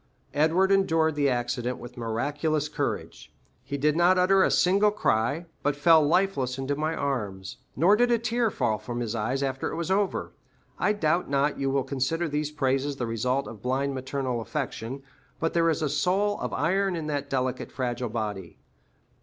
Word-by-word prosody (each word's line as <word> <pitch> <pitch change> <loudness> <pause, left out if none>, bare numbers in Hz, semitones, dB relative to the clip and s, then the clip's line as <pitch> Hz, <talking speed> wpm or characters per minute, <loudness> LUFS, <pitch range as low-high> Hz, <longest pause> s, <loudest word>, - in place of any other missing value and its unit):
Edward 165 +6 +3
endured 165 -5 +3
the 145 -1 +2
accident 125 0 -1
with 120 0 -10
miraculous 145 +6 -1
courage—he 70 - -6
did 150 +2 +2
not 175 +2 +4
utter 190 +1 +4
a - - +4
single 200 +4 +4
cry, 140 - 0 0.2
but 145 0 0
fell 160 +2 +6
lifeless 150 -5 +1
into 135 +1 -2
my 155 +2 -1
arms; 100 -9 -3 0.2
nor 175 +9 +5
did 245 +2 +3
a 240 - +4
tear 235 0 0
fall 115 - -1
from 120 +1 -5
his 115 -2 -2
eyes 125 +5 -1
after 135 -1 -2
it - - -4
was 170 +2 -3
over. 200 0 0 0.5
I 210 - +2
doubt 170 -4 0
not 140 +1 +1
you 135 0 0
will 135 0 +1
consider 145 +6 -1
these 150 0 -2
praises 140 -1 0
the 125 - -3
result 125 +4 -1
of 110 -3 -10
blind 135 +3 -1
maternal 130 -2 -3
affection, 135 0 -4 0.4
but 165 - -1
there 165 -1 +3
is 160 0 0
a - - +2
soul 195 +7 +1
of - - -3
iron 190 +5 +1
in 160 -2 -4
that 145 -2 -3
delicate, 130 -1 -2
fragile 125 -2 -2
body. 105 -6 -4
145 Hz, 180 wpm, -27 LUFS, 125-165 Hz, 0.5 s, fell